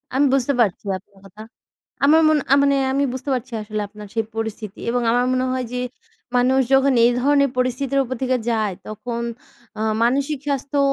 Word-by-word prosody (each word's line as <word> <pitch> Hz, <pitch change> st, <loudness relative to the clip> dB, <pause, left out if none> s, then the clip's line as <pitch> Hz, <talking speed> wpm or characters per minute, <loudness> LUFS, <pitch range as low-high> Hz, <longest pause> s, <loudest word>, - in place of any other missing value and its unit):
আমি 280 Hz, +2 st, +4 dB
বুঝতে 275 Hz, +1 st, +2 dB
পারছি 200 Hz, -6 st, 0 dB
আপনার 190 Hz, -, -21 dB
কথা। 205 Hz, +2 st, -13 dB, 0.6 s
আমার 315 Hz, +3 st, +6 dB
মনে 305 Hz, -2 st, +3 dB, 0.2 s
মানে 280 Hz, 0 st, +3 dB, 0.2 s
আমি 280 Hz, +1 st, +1 dB
বুঝতে 260 Hz, +2 st, -5 dB
পারছি 250 Hz, 0 st, -6 dB
আসলে 215 Hz, 0 st, -4 dB
আপনার 210 Hz, 0 st, -11 dB
সেই 225 Hz, -1 st, 0 dB
পরিস্থিতি 220 Hz, -2 st, -5 dB
এবং 245 Hz, +1 st, 0 dB
আমার 245 Hz, +1 st, +2 dB
মনে 255 Hz, 0 st, +1 dB
হয় 255 Hz, -1 st, -2 dB
যে 250 Hz, -, -2 dB, 0.6 s
মানুষ 255 Hz, +2 st, +3 dB
যখন 270 Hz, 0 st, +4 dB
এই 240 Hz, -, +5 dB
ধরনের 280 Hz, +1 st, +3 dB
পরিস্থিতির 255 Hz, +2 st, 0 dB
উপর 260 Hz, 0 st, -4 dB
থেকে 255 Hz, 0 st, +1 dB
যায় 215 Hz, -4 st, 0 dB
তখন 235 Hz, +2 st, -5 dB, 0.6 s
আ -, -, -2 dB, 0.2 s
মানসিক 275 Hz, +4 st, +1 dB
স্বাস্থ্য 280 Hz, 0 st, -2 dB
255 Hz, 175 wpm, -21 LUFS, 225-275 Hz, 0.6 s, আমার